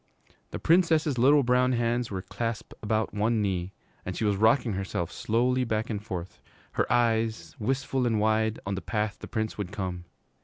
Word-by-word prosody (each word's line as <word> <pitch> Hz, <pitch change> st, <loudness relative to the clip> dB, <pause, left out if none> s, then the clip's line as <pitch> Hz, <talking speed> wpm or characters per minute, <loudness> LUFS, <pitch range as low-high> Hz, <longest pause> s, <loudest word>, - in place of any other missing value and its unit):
The -, -, -5 dB
Princess's 160 Hz, -5 st, +3 dB
little 140 Hz, +3 st, +6 dB
brown 125 Hz, +1 st, +3 dB
hands 120 Hz, 0 st, 0 dB
were 95 Hz, -2 st, -4 dB
clasped 115 Hz, +3 st, -4 dB
about 110 Hz, +1 st, 0 dB
one 110 Hz, +2 st, +1 dB
knee, 95 Hz, -3 st, -1 dB, 0.3 s
and 90 Hz, -, -5 dB
she 110 Hz, -, 0 dB
was 105 Hz, -1 st, +2 dB
rocking 110 Hz, +2 st, +3 dB
herself 95 Hz, -3 st, -3 dB
slowly 125 Hz, +3 st, +1 dB
back 110 Hz, -1 st, -1 dB
and 105 Hz, -2 st, -3 dB
forth, 90 Hz, -5 st, -6 dB, 0.3 s
her -, -, -1 dB
eyes, 115 Hz, -8 st, +1 dB
wistful 130 Hz, +2 st, 0 dB
and 110 Hz, -2 st, +1 dB
wide, 110 Hz, +1 st, +1 dB
on 100 Hz, -, -2 dB
the 95 Hz, -, -3 dB
path 105 Hz, -2 st, -2 dB
the -, -, -8 dB
Prince 110 Hz, -2 st, -3 dB
would 100 Hz, -2 st, -3 dB
come. 90 Hz, -3 st, -4 dB
110 Hz, 180 wpm, -28 LUFS, 100-120 Hz, 0.3 s, little